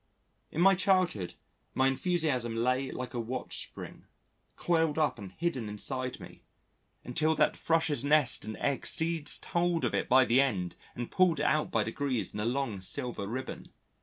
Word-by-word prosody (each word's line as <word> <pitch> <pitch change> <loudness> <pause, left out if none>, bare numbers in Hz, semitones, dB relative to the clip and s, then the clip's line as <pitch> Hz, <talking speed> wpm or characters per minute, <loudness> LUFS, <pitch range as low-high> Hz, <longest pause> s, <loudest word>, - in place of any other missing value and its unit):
In 160 - -2
my 195 +2 +7
childhood 180 - +1 0.4
my 130 - +3
enthusiasm 135 -5 0
lay 125 +3 +1
like 125 0 -6
a 120 - -2
watch 120 +3 -4
spring, - - -10 0.5
coiled 165 -3 +1
up 150 -6 +1
and 95 -2 -9
hidden 135 -11 -2
inside 130 +4 -3
me, - - -12 0.6
until 155 +6 +1
that - - +3
Thrush's 160 -5 +1
nest 145 -3 +3
and 110 0 -6
eggs 140 -2 -1
seized 160 -2 0
hold 175 -1 +1
of - - -1
it - - -1
by 130 +1 +6
the 120 +3 +4
end 95 -10 -1 0.2
and 120 -1 -5
pulled 185 -4 +3
it - - 0
out 155 0 +2
by 115 - +1
degrees 125 +2 -2
in 105 - -5
a 105 - -1
long 120 -5 -1
silver 120 0 -2
ribbon. 130 +5 -6
130 Hz, 170 wpm, -30 LUFS, 115-160 Hz, 0.6 s, my